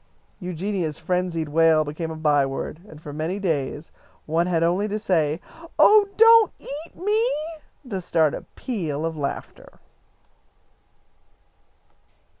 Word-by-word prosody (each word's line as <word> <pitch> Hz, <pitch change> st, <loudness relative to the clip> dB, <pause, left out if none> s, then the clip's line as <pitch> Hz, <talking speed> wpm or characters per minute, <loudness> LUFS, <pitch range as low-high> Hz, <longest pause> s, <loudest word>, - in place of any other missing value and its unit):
Eugenia's 180 Hz, -3 st, -3 dB
frenzied 170 Hz, -2 st, -2 dB
wail 160 Hz, 0 st, +4 dB
became 155 Hz, +3 st, -5 dB
a 160 Hz, -, -6 dB
byword, 145 Hz, -1 st, 0 dB
and 155 Hz, -, -12 dB
for 150 Hz, -2 st, -9 dB
many 160 Hz, +6 st, -2 dB
days 155 Hz, -5 st, -2 dB, 0.3 s
one 165 Hz, +3 st, +1 dB
had 165 Hz, -2 st, +1 dB
only 180 Hz, +5 st, +1 dB
to 210 Hz, 0 st, -2 dB
say, 165 Hz, -7 st, 0 dB, 0.4 s
"Oh, 420 Hz, -1 st, +6 dB
don't 455 Hz, 0 st, +7 dB
eat 300 Hz, +4 st, -7 dB
me!" 430 Hz, +6 st, +1 dB, 0.6 s
to 195 Hz, -6 st, -4 dB
start 160 Hz, -3 st, +2 dB
a -, -, -5 dB
peal 165 Hz, -, -3 dB
of 165 Hz, 0 st, -3 dB
laughter. 145 Hz, -2 st, -6 dB
165 Hz, 120 wpm, -23 LUFS, 155-200 Hz, 0.6 s, don't